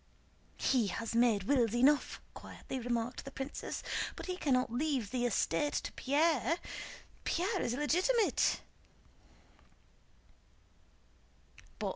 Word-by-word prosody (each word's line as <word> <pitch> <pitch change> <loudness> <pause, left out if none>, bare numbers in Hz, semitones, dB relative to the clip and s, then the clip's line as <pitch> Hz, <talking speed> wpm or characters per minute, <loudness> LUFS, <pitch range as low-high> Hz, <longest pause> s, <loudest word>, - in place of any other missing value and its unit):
"He 245 -5 +2
has 225 +4 -3
made 230 -4 +3
wills 240 -1 +2
enough!" 275 +4 +3
quietly 265 - -7
remarked 240 0 -2
the - - -7
princess. 270 +1 -5 0.3
"But - - -7
he 365 - -2
cannot 255 -8 +1
leave 260 -5 0
the 245 -1 +1
estate 235 - +1
to - - -2
Pierre. 300 +1 +2 0.7
Pierre 375 +4 0
is 235 - -1
illegitimate." 365 - +2
260 Hz, 100 wpm, -33 LUFS, 235-300 Hz, 0.7 s, made